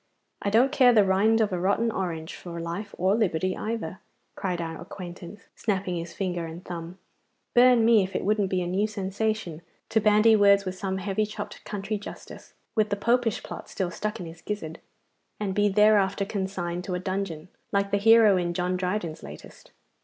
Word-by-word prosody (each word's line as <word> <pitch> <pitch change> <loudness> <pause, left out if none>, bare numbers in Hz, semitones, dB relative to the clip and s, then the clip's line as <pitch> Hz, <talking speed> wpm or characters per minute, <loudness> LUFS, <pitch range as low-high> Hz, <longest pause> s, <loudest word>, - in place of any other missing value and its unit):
'I 200 - 0
don't 240 +6 +4
care 250 -2 +6
the 215 -3 +6
rind 210 +4 +3
of 210 -3 +1
a 180 - -1
rotten 200 +5 +1
orange 170 -5 -4
for 170 -1 -8
life 175 +5 -5
or 185 +2 +2
liberty 185 -4 0
either,' 215 -6 -4 0.3
cried 180 -3 -3
our 165 -1 -5
acquaintance, 180 +2 -9
snapping 190 -4 -2
his 170 0 -5
finger 175 -3 -3
and 165 +2 -9
thumb. 170 +1 -7 0.6
'Burn 245 -2 +6
me 230 -2 +6
if 190 0 -4
it - - -1
wouldn't 205 -1 +1
be 185 -1 0
a - - -3
new 195 +4 +1
sensation 200 -4 -3 0.3
to 220 - +2
bandy 215 +1 +5
words 200 -1 +5
with 185 - -3
some 190 0 -3
heavy 195 +2 -1
chopped 210 - -7
country 205 +1 -3
justice, 205 - -11 0.2
with 215 -2 +1
the 205 - 0
Popish 235 +1 +1
plot - - -8
still 185 -3 -2
stuck 210 +4 -4
in 180 - -6
his 165 0 -11
gizzard, 165 -5 -5 0.6
and 200 -2 -2
be 205 +1 +3
thereafter 205 -1 +3
consigned 190 -4 -3
to 185 - -2
a - - -2
dungeon, 185 -3 -4 0.2
like 200 0 0
the 200 - +3
hero 220 -1 +6
in 175 -1 -1
John 180 +1 0
Dryden's 180 -3 -3
latest. 75 +1 -12
195 Hz, 190 wpm, -26 LUFS, 180-210 Hz, 0.6 s, care